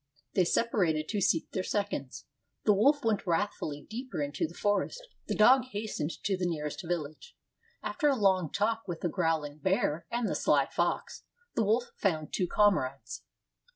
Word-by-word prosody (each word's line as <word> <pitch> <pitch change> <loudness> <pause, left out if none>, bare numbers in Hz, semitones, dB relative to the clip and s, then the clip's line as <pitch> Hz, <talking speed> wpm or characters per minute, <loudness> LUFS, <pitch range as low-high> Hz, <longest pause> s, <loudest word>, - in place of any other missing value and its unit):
They 185 - +3
separated 170 -8 +1
to 205 -2 -1
seek 170 -3 +1
their 185 - -1
seconds. 185 -9 -3 0.4
The 210 - +5
wolf 280 +8 +3
went 215 -4 0
wrathfully 165 -5 -1
deeper 245 -3 -5
into 145 +2 -1
the 170 - -14
forest; 205 - -1 0.2
the - - -1
dog 250 +4 +6
hastened 205 -7 -4
to 195 - +1
the 180 -1 -1
nearest 150 -1 -3
village. 165 - -5 0.5
After 295 - +1
a 275 - +3
long 190 - +2
talk 225 +1 0
with 175 -2 -5
the 175 - 0
growling 160 -4 -1
bear 170 -2 0
and 235 -1 -1
the - - -1
sly - - +3
fox, - - -2 0.3
the 225 - +1
wolf 230 +4 +1
found 160 -6 -1
two 180 - 0
comrades. 150 -11 +1
190 Hz, 165 wpm, -30 LUFS, 160-215 Hz, 0.5 s, dog